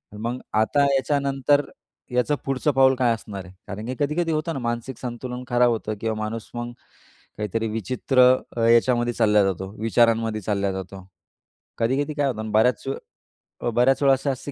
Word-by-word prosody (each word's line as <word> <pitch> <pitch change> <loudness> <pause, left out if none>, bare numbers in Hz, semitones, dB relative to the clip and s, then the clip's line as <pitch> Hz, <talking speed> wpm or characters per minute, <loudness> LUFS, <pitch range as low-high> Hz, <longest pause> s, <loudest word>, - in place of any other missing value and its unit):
मग 115 +4 -3 0.2
आता 140 +6 +2
याच्यानंतर 140 0 +2 0.5
याचं 125 +4 +1
पुढचं 135 +2 0
पाऊल 135 0 +4
काय 125 -2 +2
असणार 100 -4 -7
आहे? 90 - -14
कारण 105 +2 -6
की 125 +2 -4
कधी-कधी 155 +4 0
होतं 160 +2 -1
ना, 135 - -4
मानसिक 120 +1 -3
संतुलन 125 0 -6
खराब 120 0 +3
होतं 110 -1 -2
किंवा 110 -1 -1
माणूस 110 +1 -4
मग 120 0 -4 0.7
काहीतरी 105 +2 -2
विचित्र 120 +5 -1 0.5
याच्यामध्ये 120 0 +3
चालला 105 -3 +4
जातो, 95 0 -2
विचारांमध्ये 115 -1 +2
चालला 100 0 -1
जातो. 95 0 -7 0.7
कधी-कधी 135 +6 0
काय 145 -1 0
होतं 110 -5 -3
ना 110 - -5
बऱ्याच 110 +2 +3 0.8
अ, - - +2
बऱ्याच 125 +4 +2
वेळा 135 -1 +6
असं, 135 +2 -3
अशी 135 +2 -6
120 Hz, 160 wpm, -24 LUFS, 110-135 Hz, 0.8 s, वेळा